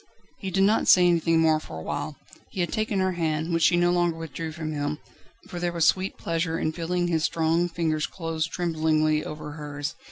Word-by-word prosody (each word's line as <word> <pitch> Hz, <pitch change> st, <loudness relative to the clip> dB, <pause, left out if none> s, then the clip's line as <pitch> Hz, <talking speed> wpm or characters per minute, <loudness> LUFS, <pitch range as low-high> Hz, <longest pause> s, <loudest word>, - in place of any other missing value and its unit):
He 195 Hz, -, -4 dB
did 195 Hz, +1 st, +2 dB
not 210 Hz, +3 st, +3 dB
say 180 Hz, -1 st, +7 dB
anything 165 Hz, -1 st, +3 dB
more 160 Hz, -1 st, +4 dB
for 115 Hz, -, -9 dB
a 80 Hz, -, -7 dB
while; -, -, -4 dB, 0.3 s
he 185 Hz, -, -3 dB
had 175 Hz, -, -2 dB
taken 215 Hz, -2 st, -1 dB
her 185 Hz, 0 st, +2 dB
hand, 160 Hz, -1 st, -1 dB
which 165 Hz, -, +1 dB
she 175 Hz, +2 st, +5 dB
no 175 Hz, 0 st, +3 dB
longer 175 Hz, -2 st, +1 dB
withdrew 165 Hz, 0 st, -5 dB
from 155 Hz, -1 st, -5 dB
him, 145 Hz, 0 st, -2 dB, 0.5 s
for 175 Hz, -, -6 dB
there 175 Hz, 0 st, -1 dB
was 170 Hz, -2 st, +1 dB
sweet 190 Hz, +1 st, +1 dB
pleasure 165 Hz, 0 st, -1 dB
in 155 Hz, -, -1 dB
feeling 175 Hz, +2 st, -1 dB
his 165 Hz, -2 st, 0 dB
strong 165 Hz, +2 st, +1 dB
fingers 160 Hz, -2 st, -1 dB
close 165 Hz, -3 st, -3 dB
tremblingly 155 Hz, -2 st, +1 dB
over 150 Hz, 0 st, -7 dB
hers. 145 Hz, -1 st, -5 dB
165 Hz, 210 wpm, -26 LUFS, 155-175 Hz, 0.5 s, say